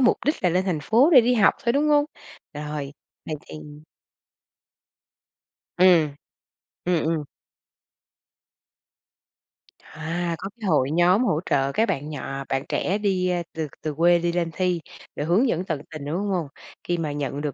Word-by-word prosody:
mục 250 Hz, -, +4 dB
đích 300 Hz, -, 0 dB
là 180 Hz, -, +4 dB
lên 180 Hz, +2 st, +1 dB
thành 175 Hz, -5 st, -1 dB
phố 240 Hz, -, +4 dB
để 255 Hz, -, +10 dB
đi 245 Hz, +2 st, +2 dB
học 215 Hz, -, +4 dB
thôi, 235 Hz, -, +3 dB
đúng 290 Hz, +3 st, +2 dB
hông? 290 Hz, -1 st, +4 dB, 0.5 s
Rồi, 150 Hz, -1 st, -5 dB, 0.3 s
vậy 155 Hz, -, -3 dB
thì -, -, -10 dB, 2.2 s
Ừm, 170 Hz, -6 st, +5 dB, 0.7 s
ừm, 175 Hz, -2 st, +1 dB
ừm. 160 Hz, -2 st, 0 dB, 2.6 s
À, 165 Hz, +2 st, -4 dB
có 195 Hz, -, -6 dB
cái 205 Hz, -, -3 dB
hội 145 Hz, -4 st, +2 dB
nhóm 180 Hz, +7 st, +4 dB
hỗ 155 Hz, -10 st, +1 dB
trợ 135 Hz, 0 st, +2 dB
các 225 Hz, +9 st, +1 dB
bạn 145 Hz, +3 st, -2 dB
nhỏ 135 Hz, -2 st, -5 dB
bạn 135 Hz, 0 st, 0 dB
trẻ 195 Hz, -, 0 dB
đi, 190 Hz, -3 st, 0 dB
ơ, 175 Hz, -1 st, 0 dB
từ 160 Hz, -1 st, -3 dB
từ 155 Hz, -1 st, -3 dB
quê 170 Hz, +3 st, +4 dB
đi 170 Hz, 0 st, 0 dB
lên 170 Hz, -1 st, -1 dB
thi, 180 Hz, -2 st, 0 dB, 0.3 s
để 145 Hz, -, -3 dB
hướng 185 Hz, -, +3 dB
dẫn 180 Hz, -6 st, 0 dB
tận 155 Hz, -5 st, -3 dB
tình, 155 Hz, -3 st, -7 dB
đúng 155 Hz, +4 st, -2 dB
hông? 180 Hz, -6 st, -1 dB, 0.4 s
Khi 175 Hz, -, 0 dB
mà 155 Hz, -3 st, -2 dB
nhận 145 Hz, -1 st, -3 dB
được 145 Hz, -2 st, -3 dB
170 Hz, 170 wpm, -24 LUFS, 150-185 Hz, 2.6 s, để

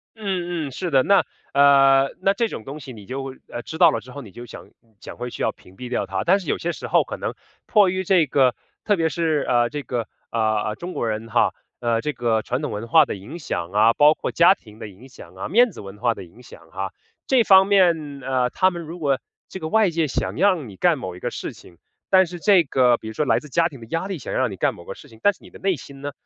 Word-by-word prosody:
嗯 175 Hz, -7 st, -3 dB
嗯， -, -, -8 dB
是 175 Hz, +5 st, -4 dB
的。 135 Hz, -1 st, +5 dB
那， 200 Hz, +7 st, +3 dB, 0.3 s
呃， 135 Hz, -1 st, +5 dB
那 195 Hz, +1 st, +3 dB
这 230 Hz, +2 st, 0 dB
种 110 Hz, -, -7 dB
东 145 Hz, +3 st, -8 dB
西 130 Hz, -3 st, -9 dB
你 105 Hz, -3 st, -12 dB
就， 135 Hz, 0 st, -5 dB
呃， 120 Hz, -, -7 dB
知 160 Hz, -, -8 dB
道 170 Hz, -2 st, +8 dB
了 -, -, -1 dB
之 125 Hz, -, -14 dB
后， 140 Hz, -, -8 dB
你 105 Hz, -6 st, -12 dB
就 120 Hz, +4 st, -10 dB
想 -, -, -12 dB, 0.3 s
想 -, -, -10 dB
会 120 Hz, 0 st, -5 dB
去 -, -, -8 dB
要 -, -, +1 dB
屏 95 Hz, -, -20 dB
蔽 125 Hz, +2 st, -8 dB
掉 110 Hz, -5 st, -1 dB
它。 95 Hz, 0 st, -3 dB
但 190 Hz, +4 st, +3 dB
是 175 Hz, -, -10 dB
有 -, -, -1 dB
些 175 Hz, -, -2 dB
时 -, -, -8 dB
候 -, -, +3 dB
可 -, -, -7 dB
能 -, -, -4 dB, 0.3 s
迫 205 Hz, -4 st, +4 dB
于 185 Hz, +1 st, -2 dB
这 175 Hz, -5 st, +3 dB
个 130 Hz, -2 st, +3 dB, 0.3 s
特 205 Hz, -, +3 dB
别 165 Hz, -2 st, +1 dB
是， 160 Hz, -3 st, 0 dB
呃， 120 Hz, -1 st, +2 dB
这 150 Hz, -1 st, -5 dB
个， 120 Hz, -2 st, -4 dB, 0.2 s
呃， 115 Hz, -, -3 dB, 0.3 s
呃， 105 Hz, -, -2 dB
中 180 Hz, +6 st, -7 dB
国 115 Hz, -, -2 dB
人 110 Hz, +1 st, -4 dB
哈， 120 Hz, -, +2 dB, 0.2 s
呃， 115 Hz, -1 st, 0 dB
这 150 Hz, -1 st, -2 dB
个 115 Hz, -2 st, 0 dB
传 125 Hz, +4 st, -2 dB
统 150 Hz, -, -3 dB
文 105 Hz, +3 st, -5 dB
化 -, -, +6 dB
的 -, -, -4 dB
影 120 Hz, -, -9 dB
响 85 Hz, -, -4 dB
啊， 110 Hz, +2 st, +5 dB
包 150 Hz, +1 st, +6 dB
括 -, -, -4 dB
家 170 Hz, +3 st, +6 dB
庭 110 Hz, -, -17 dB
的 110 Hz, -, -8 dB
影 110 Hz, +7 st, -15 dB
响 -, -, -14 dB
啊， -, -, -6 dB
面 235 Hz, +4 st, +4 dB
子 -, -, -10 dB
文 100 Hz, +1 st, -10 dB
化 120 Hz, +1 st, +1 dB
的 -, -, -9 dB
影 115 Hz, +9 st, -17 dB
响 80 Hz, -7 st, -15 dB
啊。 95 Hz, +3 st, -4 dB, 0.4 s
这 255 Hz, -3 st, +3 dB
方 190 Hz, -1 st, +7 dB
面， 170 Hz, -8 st, +2 dB
呃， 125 Hz, -1 st, 0 dB
他 185 Hz, 0 st, +3 dB
们 170 Hz, -2 st, -7 dB
如 170 Hz, +3 st, -9 dB
果 140 Hz, -4 st, +1 dB, 0.3 s
这 190 Hz, -, -7 dB
个 155 Hz, -, -4 dB
外 215 Hz, +1 st, +3 dB
界 165 Hz, -1 st, 0 dB
想 -, -, -3 dB
让 180 Hz, -, +1 dB
你 95 Hz, -, -12 dB
干 170 Hz, -, +2 dB
某 90 Hz, -7 st, -6 dB
一 -, -, -11 dB
个 -, -, -4 dB
事 -, -, -6 dB
情， 85 Hz, -1 st, -17 dB, 0.3 s
但 190 Hz, -1 st, +6 dB
是 175 Hz, +1 st, -8 dB
这 195 Hz, -4 st, +5 dB
个 125 Hz, -4 st, +3 dB
比 110 Hz, -, -10 dB
如 110 Hz, -, -6 dB
说 150 Hz, -, -1 dB
来 -, -, +2 dB
自 150 Hz, -, -13 dB
家 170 Hz, +3 st, +2 dB
庭 135 Hz, -6 st, -12 dB
的 115 Hz, -, -11 dB
压 165 Hz, +3 st, -2 dB
力 190 Hz, -6 st, -5 dB
想 -, -, -7 dB
让 130 Hz, -5 st, +1 dB
你 95 Hz, -, -8 dB
干 -, -, 0 dB
某 85 Hz, -, -14 dB
个 -, -, -6 dB
事 145 Hz, -, -15 dB
情， 110 Hz, -1 st, -17 dB
但 205 Hz, -, +5 dB
是 -, -, -26 dB
你 -, -, -14 dB
的 -, -, -13 dB
内 190 Hz, -2 st, 0 dB
心 140 Hz, +1 st, -12 dB
呢， 145 Hz, 0 st, -4 dB
140 Hz, 300 characters per minute, -22 LUFS, 115-175 Hz, 0.4 s, 道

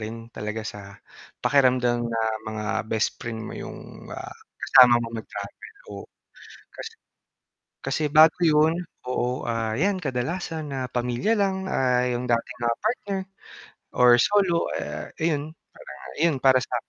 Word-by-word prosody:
rin 115 Hz, +1 st, -7 dB
talaga 105 Hz, 0 st, -5 dB
sa 105 Hz, -1 st, -6 dB, 0.6 s
pakiramdam 125 Hz, -3 st, +3 dB
na 115 Hz, -1 st, -2 dB, 0.3 s
mga 110 Hz, -1 st, -5 dB, 0.3 s
best 110 Hz, 0 st, 0 dB
friend 115 Hz, -1 st, -5 dB
mo -, -, -7 dB
'yong -, -, -10 dB
ah -, -, -8 dB, 0.3 s
kasama 125 Hz, -2 st, +7 dB
mo 115 Hz, -, -4 dB
mag-travel 110 Hz, -, -9 dB, 0.2 s
o -, -, -8 dB, 0.7 s
kasi -, -, -8 dB, 0.9 s
Kasi 135 Hz, +3 st, -2 dB
bago 155 Hz, +1 st, +7 dB
'yon, 155 Hz, 0 st, +4 dB, 0.3 s
oo 125 Hz, 0 st, -2 dB
ah 115 Hz, -1 st, -1 dB
'yan 200 Hz, 0 st, +2 dB
kadalasan 155 Hz, +4 st, -3 dB
na 135 Hz, -, -3 dB
pamilya 125 Hz, -, -1 dB
lang 190 Hz, -1 st, 0 dB
ah 125 Hz, -1 st, +2 dB
'yong 125 Hz, 0 st, -2 dB
dati 120 Hz, +1 st, 0 dB, 0.2 s
ah 115 Hz, 0 st, +2 dB
partner 205 Hz, -3 st, -1 dB, 0.8 s
or 125 Hz, -1 st, +7 dB
solo 190 Hz, -5 st, +2 dB
eh 75 Hz, +1 st, -6 dB
ayon, 155 Hz, -2 st, -1 dB, 0.7 s
ayon 165 Hz, -1 st, +3 dB
para 130 Hz, -1 st, +6 dB
sa 125 Hz, -, -4 dB
125 Hz, 135 wpm, -25 LUFS, 115-160 Hz, 0.9 s, kasama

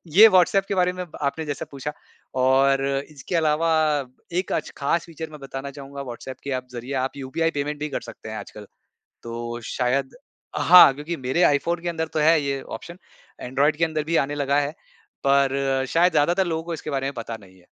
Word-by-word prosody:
ये 215 Hz, +3 st, +11 dB
व्हाट्सऐप 195 Hz, 0 st, +4 dB
के 200 Hz, -, 0 dB
बारे 180 Hz, -1 st, +2 dB
में 180 Hz, 0 st, -4 dB, 0.2 s
आपने 145 Hz, +3 st, -1 dB
जैसे 145 Hz, -2 st, -4 dB
पूछा 140 Hz, +2 st, -5 dB, 0.5 s
और 135 Hz, +1 st, +4 dB, 0.3 s
इसके 150 Hz, +5 st, -5 dB
अलावा 160 Hz, 0 st, +2 dB, 0.7 s
एक 185 Hz, -, -4 dB
अच -, -, -2 dB
ख़ास 155 Hz, +4 st, 0 dB
फ़ीचर 160 Hz, -1 st, -7 dB
मैं 150 Hz, -, -10 dB
बताना 135 Hz, 0 st, -6 dB
चाहूँगा 140 Hz, 0 st, -8 dB
व्हाट्सऐप 130 Hz, 0 st, -7 dB
के 140 Hz, -, -4 dB
अब 125 Hz, -, -18 dB
ज़रिए 120 Hz, +3 st, -6 dB
आप 135 Hz, -, -4 dB
यूपीआई 150 Hz, +5 st, -1 dB
पेमेंट 150 Hz, +1 st, -4 dB
भी 150 Hz, +1 st, -3 dB
कर 140 Hz, -, -3 dB
सकते 115 Hz, -1 st, -10 dB
हैं 110 Hz, -, -5 dB
आजकल। 105 Hz, -1 st, -9 dB, 0.6 s
तो 120 Hz, 0 st, -5 dB
शायद 130 Hz, -, 0 dB, 0.4 s
हाँ 180 Hz, -5 st, +8 dB
क्योंकि 150 Hz, +5 st, -5 dB
मेरे 150 Hz, +8 st, +2 dB
आईफ़ोन 170 Hz, +4 st, 0 dB
के 175 Hz, -, -2 dB
अंदर 160 Hz, -1 st, -2 dB
तो -, -, +1 dB
है 160 Hz, +1 st, +5 dB
ये 140 Hz, -1 st, -2 dB
ऑप्शन, 175 Hz, +2 st, -9 dB, 0.4 s
एंड्रॉइड 140 Hz, +4 st, +1 dB
के 165 Hz, -, +2 dB
अंदर 155 Hz, -2 st, -2 dB
भी 165 Hz, +2 st, 0 dB
आने 145 Hz, -, -4 dB
लगा 140 Hz, 0 st, +1 dB
है। 145 Hz, +1 st, -2 dB, 0.5 s
पर 135 Hz, -1 st, +2 dB
शायद 175 Hz, +4 st, +3 dB
ज़्यादातर 175 Hz, +5 st, +2 dB
लोगों 160 Hz, -1 st, -2 dB
को 170 Hz, -1 st, -4 dB
इसके 155 Hz, -, -6 dB
बारे 135 Hz, -1 st, -1 dB
में 140 Hz, -, -2 dB
पता 115 Hz, -1 st, -5 dB
नहीं 95 Hz, -1 st, -18 dB
है। 90 Hz, -, -23 dB
145 Hz, 200 wpm, -24 LUFS, 135-165 Hz, 0.7 s, ये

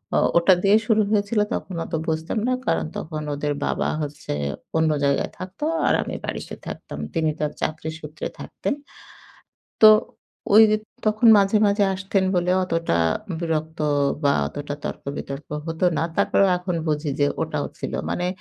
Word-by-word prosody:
ও -, -, +4 dB, 0.2 s
ওটা 180 Hz, +2 st, +6 dB
দিয়ে 205 Hz, +2 st, +6 dB
শুরু 220 Hz, -2 st, +4 dB
হয়েছিল 210 Hz, +1 st, +1 dB
তখন 185 Hz, -, -4 dB
অতো 160 Hz, -, -3 dB
বুঝতাম 160 Hz, +6 st, -1 dB
না। 255 Hz, -, +2 dB
কারণ 80 Hz, -1 st, +1 dB
তখন 155 Hz, -1 st, -5 dB
ওদের 145 Hz, 0 st, -1 dB
বাবা -, -, 0 dB
হচ্ছে 145 Hz, -, -5 dB, 0.4 s
অন্য 160 Hz, -1 st, +3 dB
জায়গায় 140 Hz, 0 st, +1 dB
থাকতো, 185 Hz, +11 st, -5 dB, 0.2 s
আর -, -, +4 dB
আমি -, -, -5 dB
বাড়িতে -, -, -5 dB
থাকতাম। -, -, -7 dB
তিনি 160 Hz, -2 st, +1 dB
তার 150 Hz, -1 st, -1 dB
চাকরি 160 Hz, 0 st, -2 dB
সূত্রে 150 Hz, 0 st, -6 dB
থাকতেন। -, -, -3 dB, 1.1 s
তো 215 Hz, -, +11 dB, 0.7 s
ওই 220 Hz, -, +9 dB, 0.4 s
তখন 215 Hz, +2 st, +3 dB
মাঝে, 200 Hz, +2 st, +3 dB
মাঝে 200 Hz, 0 st, +2 dB
আসতেন 190 Hz, 0 st, 0 dB
বলে 180 Hz, 0 st, +2 dB
অতটা 165 Hz, -, 0 dB, 0.4 s
বিরক্ত 160 Hz, -1 st, -2 dB, 0.4 s
বা 140 Hz, -1 st, +4 dB
অতটা 145 Hz, -, -5 dB
তর্ক -, -, -5 dB
বিতর্ক 140 Hz, +1 st, -6 dB, 0.2 s
হতো 165 Hz, +2 st, -1 dB
না। -, -, +1 dB
তারপরেও 200 Hz, -1 st, +3 dB
এখন 180 Hz, 0 st, -3 dB
বুঝি 150 Hz, 0 st, 0 dB
যে 145 Hz, -, +4 dB
ওটাও -, -, -2 dB
ছিলো। -, -, -3 dB
মানে 180 Hz, 0 st, -1 dB
165 Hz, 155 wpm, -23 LUFS, 150-195 Hz, 1.1 s, তো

